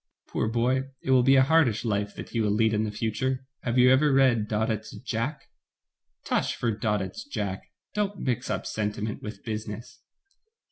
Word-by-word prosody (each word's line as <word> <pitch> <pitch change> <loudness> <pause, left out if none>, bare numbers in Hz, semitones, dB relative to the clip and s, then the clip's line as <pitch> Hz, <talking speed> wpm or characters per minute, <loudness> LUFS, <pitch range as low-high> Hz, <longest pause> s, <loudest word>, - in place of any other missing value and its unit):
Poor - - -1
boy, 125 +4 +1 0.2
it 130 - 0
will 130 -1 +6
be 135 +2 +5
a 130 - +7
hardish 135 -7 +3
life 100 -2 -1
that - - -8
he 115 - -1
will 105 - +1
lead 110 +2 +2
in 110 +1 +1
the - - -2
future. 130 +5 -2 0.2
Have 120 0 -1
you 125 0 +7
ever 145 +3 +4
read 130 -5 +4
Daudet's 110 0 -2
'Jack'?" 130 +4 -3 0.8
"Tush - - 0
for 120 - 0
Daudet's 105 -3 -2
'Jack!' 105 -9 -4 0.2
Don't 205 -1 -1
mix 125 -4 -2
up - - -2
senti 105 -1 -2
ment 105 0 -3
with 105 -2 -8
business." 110 0 -6
115 Hz, 180 wpm, -27 LUFS, 105-130 Hz, 0.8 s, a